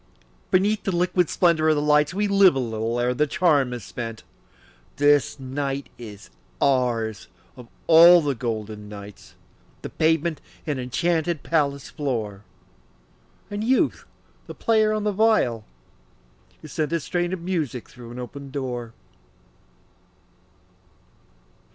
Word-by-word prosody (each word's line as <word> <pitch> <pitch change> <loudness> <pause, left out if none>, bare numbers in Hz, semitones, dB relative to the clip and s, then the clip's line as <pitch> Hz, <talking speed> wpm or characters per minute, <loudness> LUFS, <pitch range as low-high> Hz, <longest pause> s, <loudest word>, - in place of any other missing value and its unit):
Beneath 200 +3 +2
the 195 - -2
liquid 180 0 +1
splendor 165 -3 +2
of 155 - +4
the - - 0
lights 150 0 +3
We 205 +3 -1
live 195 -5 +5
a - - 0
little 115 -1 -2
ere 125 +1 +1
the 150 +4 +1
charm 145 -5 +2
is 120 -3 -6
spent; 115 +4 -7 0.7
This 145 0 +2
night 135 +1 -4
is 105 -4 -11 0.3
ours, 120 -5 0 0.3
of 125 -2 -12 0.2
all 170 +2 +8
the 145 -3 -1
golden 110 -3 -5
nights, 100 -1 -11 0.5
The - - -6
pavement 160 0 +1 0.2
an 145 -4 -2
enchanted 160 +5 -1
palace 140 -4 -1
floor, 110 -9 -3 1.1
And 205 +1 -3
Youth 255 +3 +1 0.4
the - - -8
player 220 -1 +2
on 215 -1 -1
the 210 - +1
viol, 195 - +2 1.0
who - - -8
sent 150 0 -3
A 170 - +1
strain 175 +3 -2
of 185 -2 -4
music 160 -9 -3
through 120 -2 -13
an 120 - -9
open 135 +3 -8
door. 125 -4 -5
145 Hz, 130 wpm, -23 LUFS, 120-170 Hz, 1.1 s, all